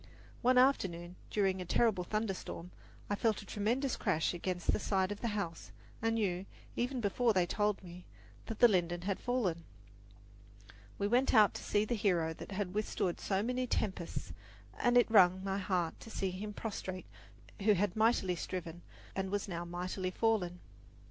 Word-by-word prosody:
One 255 Hz, +1 st, +4 dB
afternoon, 180 Hz, -10 st, +2 dB
during 190 Hz, -3 st, +1 dB
a -, -, -2 dB
terrible 195 Hz, 0 st, +2 dB
thunderstorm, 195 Hz, -3 st, -3 dB, 0.4 s
I -, -, -1 dB
felt 215 Hz, +1 st, +1 dB
a -, -, -14 dB
tremendous 235 Hz, +7 st, 0 dB
crash 160 Hz, +3 st, 0 dB
against 175 Hz, 0 st, -1 dB
the -, -, +1 dB
side 190 Hz, -2 st, +1 dB
of 205 Hz, -, -5 dB
the 235 Hz, -, 0 dB
house 170 Hz, -5 st, -4 dB, 0.3 s
and 225 Hz, 0 st, +1 dB
knew, 195 Hz, -4 st, -1 dB, 0.3 s
even 250 Hz, +1 st, -1 dB
before 225 Hz, +3 st, +2 dB
they 185 Hz, -3 st, +3 dB
told 210 Hz, +2 st, 0 dB
me, 180 Hz, 0 st, -11 dB, 0.4 s
that 225 Hz, -, -4 dB
the 240 Hz, -, +8 dB
linden 175 Hz, -4 st, +1 dB
had 195 Hz, 0 st, -1 dB
fallen. 205 Hz, -10 st, -1 dB, 1.3 s
We 200 Hz, -, -1 dB
went 250 Hz, +4 st, +3 dB
out 210 Hz, -3 st, +7 dB
to -, -, -7 dB
see 205 Hz, +1 st, +1 dB
the 240 Hz, -, -1 dB
hero 180 Hz, -7 st, +1 dB
that 195 Hz, -, -9 dB
had 190 Hz, -2 st, -2 dB
withstood 205 Hz, -4 st, -1 dB
so 195 Hz, 0 st, 0 dB
many 250 Hz, +2 st, -1 dB
tempests, 180 Hz, -, -2 dB, 0.5 s
and 245 Hz, 0 st, +4 dB
it 245 Hz, -, +7 dB
wrung 185 Hz, -3 st, +6 dB
my 195 Hz, 0 st, -1 dB
heart 180 Hz, -4 st, -1 dB
to -, -, -11 dB
see 195 Hz, -3 st, -2 dB
him 205 Hz, +3 st, -5 dB
prostrate 190 Hz, -4 st, -5 dB, 0.6 s
who 210 Hz, +1 st, +5 dB
had 200 Hz, -1 st, 0 dB
mightily 215 Hz, -5 st, +3 dB
striven 175 Hz, -1 st, -5 dB, 0.3 s
and 190 Hz, 0 st, -1 dB
was 205 Hz, +1 st, -2 dB
now 175 Hz, -2 st, -4 dB
mightily 180 Hz, +2 st, -3 dB
fallen. 185 Hz, -4 st, 0 dB
195 Hz, 170 wpm, -34 LUFS, 180-220 Hz, 1.3 s, the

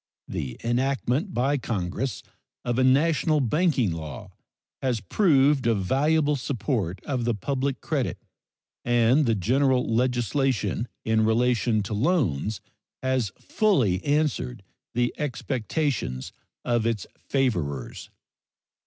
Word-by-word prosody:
The 65 Hz, -2 st, -4 dB
enactment 130 Hz, -, 0 dB
by 135 Hz, +2 st, +1 dB
Congress 115 Hz, +3 st, -3 dB, 0.4 s
of 120 Hz, +1 st, 0 dB
a -, -, +4 dB
national 150 Hz, +3 st, +3 dB
banking 135 Hz, -, +2 dB
law 80 Hz, -6 st, -7 dB, 0.5 s
has 125 Hz, -4 st, 0 dB
proved 140 Hz, -, +3 dB
a 115 Hz, -, +3 dB
valuable 145 Hz, +9 st, +2 dB
support 120 Hz, -, -2 dB
of 130 Hz, -4 st, -1 dB
the 120 Hz, -1 st, +1 dB
public 135 Hz, +3 st, -2 dB
credit -, -, -1 dB, 0.7 s
and 120 Hz, +4 st, +3 dB
the 115 Hz, -, +3 dB
general 130 Hz, +6 st, +2 dB
legislation 120 Hz, -1 st, 0 dB, 0.2 s
in 110 Hz, 0 st, +2 dB
relation 115 Hz, -1 st, +2 dB
to 100 Hz, -, -5 dB
loans 110 Hz, -, 0 dB, 0.4 s
has 130 Hz, -6 st, 0 dB
fully 130 Hz, -, +1 dB
answered 140 Hz, -6 st, 0 dB, 0.3 s
the 120 Hz, 0 st, +1 dB
expectations 130 Hz, -, -2 dB, 0.3 s
of 120 Hz, -2 st, +1 dB
its 115 Hz, -4 st, -1 dB
favorers. 85 Hz, -, -2 dB
125 Hz, 110 wpm, -26 LUFS, 110-140 Hz, 0.7 s, a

